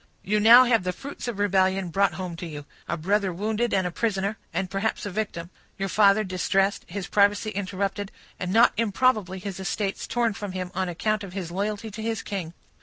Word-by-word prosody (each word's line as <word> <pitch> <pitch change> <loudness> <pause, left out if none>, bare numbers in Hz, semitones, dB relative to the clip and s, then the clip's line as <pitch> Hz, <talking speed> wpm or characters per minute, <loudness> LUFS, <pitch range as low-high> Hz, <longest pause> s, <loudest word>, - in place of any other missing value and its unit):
"You 210 +2 +1
now 235 +4 +9
have 235 -5 +2
the 180 0 -1
fruits 275 +6 -8
of 235 -4 -3
rebellion 190 -2 +2
brought 195 +3 +2
home 180 -2 -5
to 175 - -6
you; 145 -2 -8 0.2
a - - -2
brother 195 +4 +1
wounded 215 +6 -1
and 190 -1 +1
a 180 - -1
prisoner, 200 0 -1 0.2
and 190 - -1
perhaps 195 +4 -2
a 205 - -4
victim; 180 -4 -4 0.3
your 195 0 -2
father 205 +2 +5
distressed, 195 +1 0
his 195 +1 -5
privacy 205 +1 +2
interrupted, 200 0 -3 0.3
and 180 0 -3
not 230 +4 +5
improbably 215 -3 +1
his 190 0 -6
estates 195 +1 -2
torn 235 -2 +1
from 200 -1 -6
him, 185 -1 -4
on 185 -1 -1
account 215 +4 -1
of 185 -2 -8
his 185 -4 -5
loyalty 210 +3 -3
to 215 +2 -7
his 225 -1 -2
king." 180 -5 -5
200 Hz, 200 wpm, -25 LUFS, 185-215 Hz, 0.3 s, now